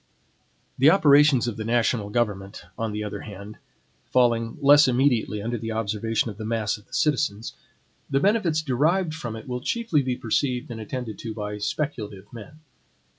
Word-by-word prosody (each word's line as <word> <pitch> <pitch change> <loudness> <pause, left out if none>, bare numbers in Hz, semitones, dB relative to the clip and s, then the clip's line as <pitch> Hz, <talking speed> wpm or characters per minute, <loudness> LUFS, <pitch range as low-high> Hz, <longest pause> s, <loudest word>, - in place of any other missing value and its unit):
The 135 +4 +7
operations 145 -7 +5
of 120 - -4
the 110 - -4
national 115 -2 0
government, 105 -5 -2
on 115 -1 -3
the 105 0 -3
other 105 - -5
hand, 100 +1 -10 0.5
falling 115 -2 +1
less 145 +1 +6
immediately 120 -5 +1
under 120 +1 -3
the 115 0 -4
observation 110 +1 -1
of 100 - -12
the - - -5
mass 110 -1 -1
of 105 - -16
the - - -21
citizens, 135 -8 0 0.6
the 135 -1 +2
benefits 175 -4 +1
derived 155 +6 +1
from 120 -8 -5
it 110 - -10
will 125 -1 -4
chiefly 225 - 0
be 125 -2 -2
perceived 125 +2 -1
and 110 -1 -6
attended 115 +1 -6
to 110 -2 -6
by 105 -1 -5
speculative 105 -6 -4
men. 130 +7 -11
120 Hz, 170 wpm, -24 LUFS, 110-140 Hz, 0.6 s, The